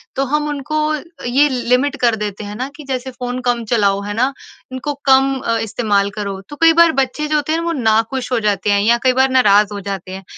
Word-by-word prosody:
तो 275 - 0
हम 300 0 0
उनको 295 +2 -3
अ, 305 -1 -2 0.2
ये 270 +4 +3
लिमिट 250 +3 0
कर 235 -2 +3
देते 210 -1 -5
हैं 205 0 -7
ना 255 +3 -3
कि 300 - -11
जैसे, 260 0 -3
"फ़ोन 250 0 -5
कम 245 -1 0
चलाओ। 200 -3 +1
है 205 - -4
ना? 235 +4 +2 0.5
उनको 290 +3 -4
कम 270 0 +4
अ, 230 -2 -1
इस्तेमाल 205 -2 0
करो।" 200 -2 -4
तो 290 - -8
कई 330 0 +6
बार 335 - +6
बच्चे 270 +3 -1
जो 305 - 0
होते 300 0 0
हैं 325 - +1
ना, 335 - -4
वो 335 - 0
नाखुश 225 +3 0
हो 245 - +2
जाते 205 0 0
हैं 200 0 +3
या 235 +3 +3
कई 255 - +4
बार 265 - +3
नाराज़ 210 -4 +4
हो 205 - -5
जाते 190 -2 -5
हैं। 190 - -9
245 Hz, 245 wpm, -17 LUFS, 210-275 Hz, 0.5 s, कई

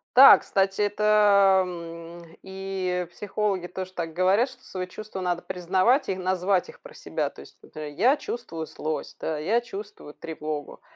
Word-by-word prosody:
Да, 265 +2 +11
кстати, 195 +1 0
это, 205 -2 +4
м, 170 -1 -9
и 190 -2 -3
психологи 200 -1 -2
тоже 185 +1 -6
так 165 -3 -4
говорят, 190 - +3
что 255 - -17
свои 185 -1 -5
чувства 195 +1 -8
надо 175 -1 -1
признавать 190 - +1
и 190 - 0
назвать 185 0 0
их 480 - -14
про - - -13
себя. - - -3
То - - -13
есть, - - -16
например: 150 -1 -8
"Я 255 +8 +5
чувствую 165 - -6
злость". 155 0 -5
Да, 155 -2 -3
"Я 205 +10 +2
чувствую 205 -9 -9
тревогу". 155 -2 -6
185 Hz, 160 wpm, -26 LUFS, 170-205 Hz, -, Да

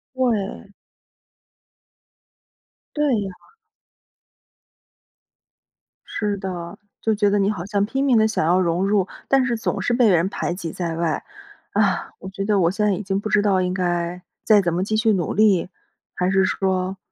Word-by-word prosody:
对。 220 -6 -1 2.3
对 300 0 +1 0.2
呀。 195 -2 -5 2.7
是 205 -2 -2
的， 180 -3 -6 0.2
就 220 - +1
觉 205 0 +2
得 205 +1 +2
你 200 +1 +2
好 180 -5 -5
像 200 0 0
拼 265 +6 -2
命 255 -4 +4
地 220 0 +4
想 215 -7 -1
要 175 +3 +3
融 180 +1 +1
入， 200 -2 +2 0.2
但 270 -1 +3
是 240 -2 -1
总 225 - -2
是 245 - 0
被 240 -2 +4
人 175 0 +3
排 175 - -3
挤 170 -3 -5
在 170 -1 -3
外。 165 -1 -1 0.5
啊， 200 -2 +1
我 190 - -9
觉 195 +1 -5
得 205 0 +2
我 170 -2 +3
现 210 +2 -1
在 205 - +3
已 190 - -4
经 195 0 -1
不 215 - -4
知 210 - +3
道 195 -3 +2
应 180 0 -1
该 175 -1 -2 0.2
再 210 -2 +5
怎 175 -3 -1
么 180 +2 0
继 215 +2 -1
续 220 0 +3
努 175 -5 -1
力， 200 -5 +3 0.5
还 180 0 0
是 190 0 +3
说 190 -1 -1
195 Hz, 180 characters per minute, -22 LUFS, 180-210 Hz, 2.7 s, 再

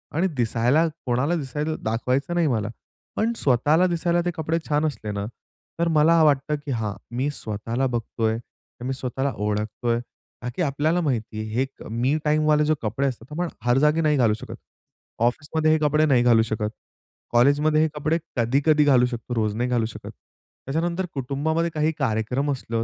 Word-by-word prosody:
आणि 180 +4 +2
दिसायला 120 +7 +2 0.2
कोणाला 130 +7 +1
दिसायला 150 +1 -3
दाखवायचं 125 +8 -1
नाही 170 -2 +3
मला, 110 -5 0 0.5
पण 225 +2 +1
स्वतःला 145 +7 +3
दिसायला 175 0 +1
ते 175 - +1
कपडे 160 +1 -1
छान 150 +1 +2
असले 125 -8 -3
ना, 100 0 -3 0.5
तर 170 - +2
मला 160 +1 +4
वाटतं 150 0 +2
की 140 - -3
हां, 110 -4 -2 0.2
मी 135 +4 0
स्वतःला 115 +2 -2
बघतोय. 115 -2 -1
तर 120 +1 -15
मी 135 - -1
स्वतःला 135 +1 -2
ओळखतोय, 105 +3 -1 0.4
का 125 - -3
की - - -2
आपल्याला 155 +3 +1
माहिती 115 -7 -2
आहे, 110 - -5
हे 130 +2 +2 0.2
मी 125 +7 +1
टाईम 150 0 +2
वाले 150 0 +4
जो 155 - +2
कपडे 115 +6 -1
असतात 125 +1 -6
आपण 175 +3 -2 0.2
हर 120 +1 +3
जागी 150 +3 +3
नाही 150 -2 +2
घालू 115 -4 +4
शकत, - - -8 0.6
ऑफिसमध्ये 155 +6 +1
हे 155 - +4
कपडे 155 +1 +3
नाही 130 -5 +4
घालू 115 -2 +5
शकत, 110 -1 -1 0.6
कॉलेजमध्ये 145 +5 +4
हे 160 - +4
कपडे 155 +2 0 0.2
कधी-कधी 140 +6 +3
घालू 130 -4 +5
शकतो, 120 0 -5
रोज 110 -2 0
नाही 125 +2 -1
घालू 120 -2 +1
शकत. 110 - -8 0.5
त्याच्यानंतर 170 +6 -1
कुटुंबामध्ये 150 +5 -1
काही 155 +1 +1
कार्यक्रम 125 +3 0
असलं, 115 -3 -2
135 Hz, 175 wpm, -24 LUFS, 120-155 Hz, 0.6 s, घालू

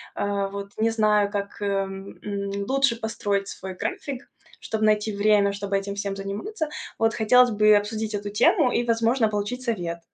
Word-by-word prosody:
Э, 200 -1 -1
вот 200 0 -6
не 220 +1 +2
знаю, 210 -2 +2
как, 200 0 -4
э, - - -1
м, 195 -1 -3 0.5
лучше 275 -2 +2
построить 205 -3 -1
свой 190 -1 -7
график, 285 - -5 0.3
чтобы 220 -1 -1
найти 215 0 +2
время, 205 -1 +3
чтобы 200 0 -1
этим 200 0 -4
всем 200 -1 -3
заниматься. 300 - -4 0.3
Вот 225 0 +2
хотелось 245 +3 +5
бы 215 0 +5
обсудить 215 +1 -1
эту 205 0 -4
тему 250 - +4
и, 240 - +1
возможно, 230 0 +2
получить 210 +4 -3
совет. 175 -8 -2
210 Hz, 165 wpm, -25 LUFS, 200-230 Hz, 0.5 s, хотелось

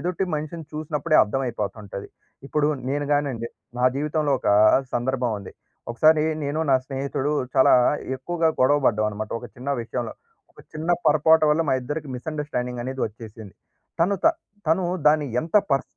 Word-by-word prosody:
ఎదుటి 180 +3 -1
మనిషిని 155 +1 -6
చూసినప్పుడే 155 0 0
అర్థమైపోతుంటది. 105 -4 -4 0.4
ఇప్పుడు 150 -1 +1 0.2
నేను 145 0 -1
గానండి, 130 -5 -2 0.3
నా - - +2
జీవితంలో 150 0 0
ఒకా 100 - +2 0.4
సందర్భమండి. 120 -5 -2 0.4
ఒకసారి 155 +5 +4 0.2
నేను, 145 +2 -2
నా 135 - +6
స్నేహితుడూ 135 +1 -2 0.2
చాలా 130 - +5 0.4
ఎక్కువగా 165 +4 0
గొడవ 135 +3 +5
పడ్డావనమాట 105 0 0
ఒక 120 - -9
చిన్న 130 +3 -4
విషయంలో. 115 0 -4 0.4
ఒక - - -16
చిన్న 160 +3 -3
పొరపాటు 155 +1 +5
వల్ల 155 +2 +3
మా 135 - +3
ఇద్దరికి 145 +3 -5
మిస్అండర్‌స్టాండింగనేది 130 -3 -4
వచ్చేసింది. 110 -2 -11 0.5
తను 195 +4 +3
త - - +7 0.4
తను 175 +3 +2 0.2
దాన్ని 150 -1 +4
ఎంత 165 +6 0
పర్స్ 135 0 +2
140 Hz, 135 wpm, -24 LUFS, 120-155 Hz, 0.5 s, త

